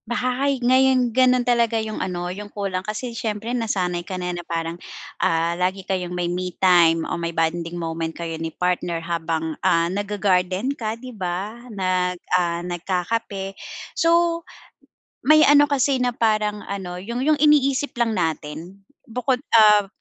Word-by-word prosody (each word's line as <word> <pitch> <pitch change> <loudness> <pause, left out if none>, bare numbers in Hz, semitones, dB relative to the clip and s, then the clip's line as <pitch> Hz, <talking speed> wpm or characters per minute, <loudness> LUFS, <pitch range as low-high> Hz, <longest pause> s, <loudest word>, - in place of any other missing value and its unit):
Baha 255 +3 0
hay, 275 - +1
ngayon 255 -1 +4
gano'n 255 0 +4
talaga 235 -2 +2
'yong 220 -1 -3
ano, 180 -1 -3
'yong 205 +2 -8
kulang 195 -3 -3
kasi 220 +5 -5
siyempre 225 +1 -3
nasanay 185 -7 -1
ka 185 +2 -6
na 180 0 -3
na 175 - -5
parang, 165 0 -4 0.4
ah, 165 +1 +2
lagi 185 +2 -2
kayong 185 -2 -2
may 180 0 -2
me 180 0 -3
time 170 -3 +4
o - - -3
may 170 - -1
bonding 165 +1 -1
moment 165 -1 -3
kayo 170 -1 -4
ni 165 - -2
partner 175 0 -1
habang, 165 -1 -2
ah, 165 0 +3
nag-ga-garden 200 +2 0
ka, 225 -4 -4
'di 255 +1 -10
ba? 190 +1 -3 0.2
Nag, 185 -3 -1 0.2
ah, 175 -1 +1
nagkakape. 190 +3 -3 0.4
So, 335 0 +2 0.8
may 310 +2 +6
ano 290 0 +6
kasi 270 -2 +2
na 250 - +2
parang 215 -3 0
ano, 185 -3 -5
'yong 235 +7 -4
'yong 305 +1 +3
iniisip 290 -2 +3
lang 235 -2 +1
natin, 165 0 -3 0.2
bukod, 250 +2 -1 0.2
ah, 210 -2 +7
195 Hz, 155 wpm, -22 LUFS, 175-240 Hz, 0.8 s, ah